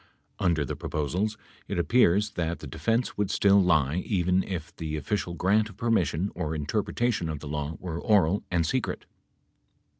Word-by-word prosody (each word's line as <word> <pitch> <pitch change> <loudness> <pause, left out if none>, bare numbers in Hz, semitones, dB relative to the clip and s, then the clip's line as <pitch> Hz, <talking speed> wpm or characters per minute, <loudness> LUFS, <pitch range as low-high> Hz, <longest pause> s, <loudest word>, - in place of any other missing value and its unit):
Under 85 -6 +2
the 75 - -4
proposals, 85 +7 -2 0.3
it 100 - -3
appeal's 105 +2 +3
that 85 0 -2
the - - -9
defense 115 - -1
would 100 -2 +1
still 100 0 +4
lie 80 -4 +2
even 90 -1 +1
if 90 -4 -6
the 80 -1 -3
official 85 +3 -2
grant 105 +5 +2
of 100 - -14
permission 95 -5 +1
or 80 -3 -3
interpretation 105 +4 -1
of 80 - -3
the 75 - -8
law 75 +1 -3
were 85 -2 -5
oral 100 -4 +3
and 85 -2 +1
secret. 130 +4 -2
90 Hz, 160 wpm, -27 LUFS, 80-105 Hz, 0.3 s, still